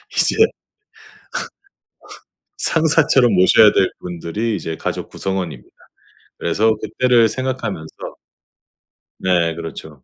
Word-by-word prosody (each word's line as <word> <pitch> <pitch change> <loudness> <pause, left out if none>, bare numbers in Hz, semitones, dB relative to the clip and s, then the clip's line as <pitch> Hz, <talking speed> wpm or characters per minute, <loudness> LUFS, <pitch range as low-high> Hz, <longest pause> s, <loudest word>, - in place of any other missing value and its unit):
이제 - - +2 2.2
상사처럼 150 -6 +3
모셔야 100 +4 +6
될 95 - +2
분들이 90 +6 -3
이제 80 -3 -5
가족 - - -4
구성원입니다. 95 -4 -5 0.7
그래서 110 +6 +1
그때를 120 -3 +2
생각하면서 115 -9 -4 1.3
네 85 -3 +1
그렇죠. 80 0 -9
100 Hz, 225 characters per minute, -19 LUFS, 85-120 Hz, 2.2 s, 모셔야